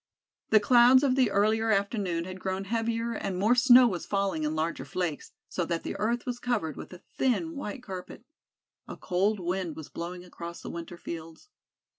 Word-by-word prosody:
The 215 Hz, -, +6 dB
clouds 245 Hz, +4 st, +6 dB
of 270 Hz, -3 st, +3 dB
the 255 Hz, -4 st, +3 dB
earlier 215 Hz, +3 st, +2 dB
afternoon 200 Hz, -4 st, 0 dB
had 185 Hz, +1 st, -8 dB
grown 190 Hz, +1 st, -3 dB
heavier 230 Hz, +2 st, -1 dB
and 195 Hz, -4 st, -3 dB
more 210 Hz, +6 st, +3 dB
snow 250 Hz, 0 st, +7 dB
was 185 Hz, -6 st, -3 dB
falling 195 Hz, -5 st, 0 dB
in 155 Hz, +1 st, -1 dB
larger 160 Hz, -3 st, -2 dB
flakes, 165 Hz, +1 st, -4 dB, 0.2 s
so 180 Hz, -, -2 dB
that 170 Hz, 0 st, -2 dB
the -, -, -4 dB
earth 235 Hz, +3 st, -1 dB
was 245 Hz, -1 st, -3 dB
covered 215 Hz, -, -1 dB
with -, -, -9 dB
a 180 Hz, -, -12 dB, 0.2 s
thin 310 Hz, +6 st, +1 dB
white 250 Hz, -3 st, -6 dB
carpet. 190 Hz, +3 st, -8 dB, 0.6 s
A -, -, -8 dB
cold 195 Hz, +3 st, 0 dB
wind 180 Hz, -2 st, -2 dB
was 160 Hz, -, -9 dB
blowing 175 Hz, +1 st, -6 dB
across 170 Hz, -1 st, -9 dB
the -, -, -6 dB
winter 170 Hz, +1 st, -7 dB
fields. 165 Hz, -, -8 dB
195 Hz, 185 wpm, -28 LUFS, 175-235 Hz, 0.6 s, snow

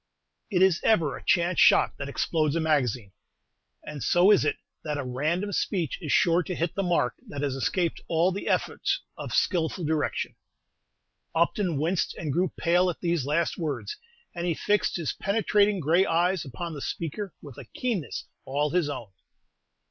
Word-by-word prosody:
It 185 Hz, -4 st, +3 dB
is 190 Hz, -3 st, +3 dB
ever 165 Hz, -11 st, +3 dB
a -, -, -10 dB
chance 175 Hz, +1 st, +2 dB
shot -, -, +5 dB
that 140 Hz, -1 st, -4 dB
explodes 155 Hz, +1 st, 0 dB
a -, -, +1 dB
magazine, 130 Hz, -10 st, 0 dB, 0.7 s
and 150 Hz, -2 st, -7 dB
so 180 Hz, +9 st, +5 dB
is 205 Hz, -, +5 dB
it 150 Hz, -, +1 dB, 0.3 s
that 150 Hz, -1 st, -2 dB
a 145 Hz, -, -2 dB
random 155 Hz, +11 st, -1 dB
speech 180 Hz, -5 st, -1 dB
is 155 Hz, -, -3 dB
sure 170 Hz, 0 st, +4 dB
to 180 Hz, +1 st, -4 dB
hit 165 Hz, 0 st, -1 dB
the 195 Hz, -, -1 dB
mark 175 Hz, -9 st, +1 dB
that 145 Hz, 0 st, -5 dB
has 140 Hz, -2 st, 0 dB
escaped 170 Hz, +5 st, -1 dB
all 170 Hz, +3 st, +2 dB
the 195 Hz, -, -5 dB
efforts -, -, 0 dB
of -, -, -7 dB
skilful 170 Hz, -1 st, 0 dB
direction. 155 Hz, -1 st, -1 dB, 1.0 s
Upton 170 Hz, 0 st, +1 dB
winced 170 Hz, +5 st, 0 dB
and 150 Hz, -4 st, -3 dB
grew 180 Hz, +1 st, +1 dB
pale 175 Hz, +2 st, +3 dB
at 175 Hz, -, -4 dB
these 170 Hz, -6 st, 0 dB
last 160 Hz, +3 st, 0 dB
words, 160 Hz, -, -3 dB, 0.4 s
and 175 Hz, 0 st, -3 dB
he 170 Hz, -, +1 dB
fixed 205 Hz, +2 st, +1 dB
his 165 Hz, -5 st, -2 dB
penetrating 205 Hz, 0 st, +2 dB
gray 165 Hz, +4 st, +3 dB
eyes 175 Hz, +1 st, +1 dB
upon 165 Hz, +6 st, -6 dB
the 145 Hz, -, -7 dB
speaker 175 Hz, +6 st, -4 dB
with 140 Hz, -5 st, -11 dB
a -, -, -9 dB
keenness 220 Hz, -, -3 dB, 0.2 s
all 145 Hz, +2 st, -1 dB
his 175 Hz, -4 st, +1 dB
own. 115 Hz, -8 st, -6 dB
170 Hz, 175 wpm, -27 LUFS, 150-180 Hz, 1.0 s, shot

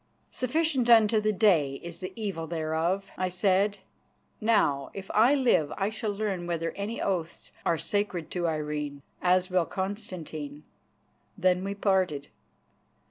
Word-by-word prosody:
"Sufficient 265 Hz, -1 st, +1 dB
unto 220 Hz, -2 st, +6 dB
the 215 Hz, 0 st, +2 dB
day 175 Hz, -10 st, +3 dB
is 170 Hz, 0 st, -7 dB
the 185 Hz, 0 st, -5 dB
evil 195 Hz, -7 st, -4 dB
thereof," 165 Hz, +4 st, -1 dB
I 185 Hz, 0 st, +1 dB
said. 195 Hz, +2 st, +2 dB, 0.6 s
"Now 205 Hz, -11 st, +2 dB
if 195 Hz, -1 st, -6 dB
I 235 Hz, +7 st, +5 dB
live 240 Hz, -, +3 dB
I 200 Hz, +1 st, 0 dB
shall 215 Hz, 0 st, -3 dB
learn 200 Hz, -4 st, -2 dB
whether 165 Hz, -1 st, -1 dB
any 205 Hz, +3 st, -4 dB
oaths 170 Hz, -4 st, -3 dB, 0.2 s
are 165 Hz, -, +3 dB
sacred 180 Hz, -1 st, -2 dB
to 175 Hz, -2 st, -1 dB
Irene, 150 Hz, -2 st, -3 dB, 0.2 s
as 185 Hz, +1 st, +3 dB
will 180 Hz, -2 st, +2 dB
Constantine." 170 Hz, -7 st, -5 dB, 0.7 s
Then 185 Hz, -1 st, +2 dB
we 200 Hz, +1 st, -3 dB
parted. 185 Hz, -8 st, +1 dB
185 Hz, 135 wpm, -28 LUFS, 165-205 Hz, 0.7 s, unto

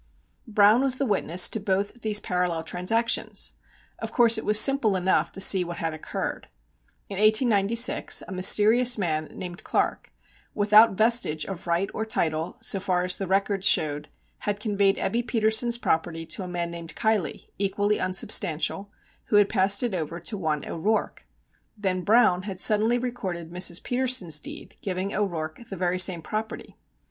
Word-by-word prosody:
Browne 215 Hz, +2 st, +4 dB
was 265 Hz, -1 st, +2 dB
the 275 Hz, -, -1 dB
witness 185 Hz, -5 st, +3 dB
to 220 Hz, -, -4 dB
both 200 Hz, +4 st, -3 dB
these 215 Hz, -1 st, +2 dB
parallel 180 Hz, -4 st, -2 dB
transactions! 225 Hz, +8 st, -1 dB, 0.5 s
Of -, -, -6 dB
course 235 Hz, -2 st, +4 dB
it -, -, -9 dB
was 210 Hz, 0 st, +6 dB
simple 245 Hz, -5 st, +4 dB
enough 185 Hz, 0 st, 0 dB
to -, -, -6 dB
see 190 Hz, -1 st, +5 dB
what 175 Hz, 0 st, -7 dB
had 165 Hz, -1 st, -3 dB
occurred. 155 Hz, -, -6 dB, 0.6 s
In 195 Hz, -1 st, -6 dB
1896 220 Hz, +3 st, +2 dB
a -, -, -10 dB
mysterious 215 Hz, +6 st, +4 dB
man, 155 Hz, -5 st, -2 dB
named 175 Hz, +2 st, -9 dB
Clark, -, -, -2 dB, 0.4 s
without 210 Hz, +1 st, +5 dB
vestige 220 Hz, -8 st, +2 dB
of 185 Hz, -2 st, -9 dB
right 170 Hz, +3 st, 0 dB
or 220 Hz, -, -3 dB
title, 160 Hz, -7 st, -2 dB
so 195 Hz, -, 0 dB
far 180 Hz, -1 st, -1 dB
as 180 Hz, 0 st, +1 dB
the 195 Hz, -, -5 dB
records 195 Hz, +1 st, 0 dB
showed, 150 Hz, -5 st, +1 dB, 0.3 s
had 205 Hz, 0 st, -4 dB
conveyed 200 Hz, -2 st, +1 dB
Ebbe 235 Hz, -, -1 dB
Petersen's 230 Hz, +1 st, +1 dB
property 165 Hz, -5 st, -2 dB
to 160 Hz, +4 st, -5 dB
a 185 Hz, -, -6 dB
man 175 Hz, -1 st, -4 dB
named 170 Hz, -1 st, -8 dB
Keilly, 220 Hz, -7 st, -2 dB
equally 205 Hz, +1 st, 0 dB
unsubstantial, 185 Hz, 0 st, 0 dB, 0.4 s
who -, -, -2 dB
had 205 Hz, -1 st, +4 dB
passed 200 Hz, +1 st, +2 dB
it 240 Hz, -4 st, -2 dB
over 165 Hz, -1 st, -5 dB
to 210 Hz, +6 st, -4 dB
one 155 Hz, -6 st, -3 dB
O'Rourke. 210 Hz, +7 st, -3 dB, 0.5 s
Then 190 Hz, -3 st, -2 dB
Browne 190 Hz, -2 st, +3 dB
had 190 Hz, -1 st, -8 dB
suddenly 220 Hz, +4 st, +3 dB
recorded 190 Hz, -9 st, -6 dB
Mrs. 180 Hz, -1 st, -1 dB
Petersen's 245 Hz, -, +1 dB
deed -, -, -11 dB
giving 190 Hz, +1 st, -4 dB
O'Rourke 160 Hz, -6 st, -4 dB
the 195 Hz, -, -7 dB
very 180 Hz, 0 st, -1 dB
same 175 Hz, -2 st, +2 dB
property. 215 Hz, +5 st, -6 dB
195 Hz, 160 wpm, -24 LUFS, 175-220 Hz, 0.6 s, was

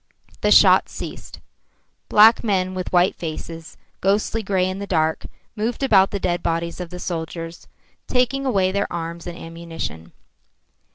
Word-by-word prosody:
The -, -, +2 dB
shots -, -, +6 dB
ceased. -, -, -8 dB, 0.7 s
Black 220 Hz, +2 st, +6 dB
men 185 Hz, -4 st, 0 dB
with 185 Hz, -1 st, -4 dB
white 180 Hz, +1 st, +4 dB
faces, 165 Hz, 0 st, -7 dB, 0.2 s
ghostly 205 Hz, +3 st, +1 dB
grey 190 Hz, -3 st, 0 dB
in 185 Hz, +1 st, -4 dB
the 200 Hz, -, -5 dB
dark, 160 Hz, -4 st, 0 dB, 0.3 s
moved 225 Hz, +5 st, -2 dB
about 195 Hz, -7 st, +5 dB
the 200 Hz, -, -3 dB
dead 175 Hz, -2 st, -1 dB
bodies 170 Hz, +1 st, -2 dB
of 180 Hz, -2 st, -5 dB
the 180 Hz, -, -8 dB
soldiers, 165 Hz, -1 st, -6 dB, 0.4 s
taking 255 Hz, +2 st, +1 dB
away 195 Hz, -8 st, +1 dB
their 200 Hz, +1 st, -1 dB
arms 170 Hz, 0 st, -5 dB
and 175 Hz, 0 st, -6 dB
ammunition. 165 Hz, -, -7 dB
180 Hz, 150 wpm, -22 LUFS, 165-200 Hz, 0.7 s, shots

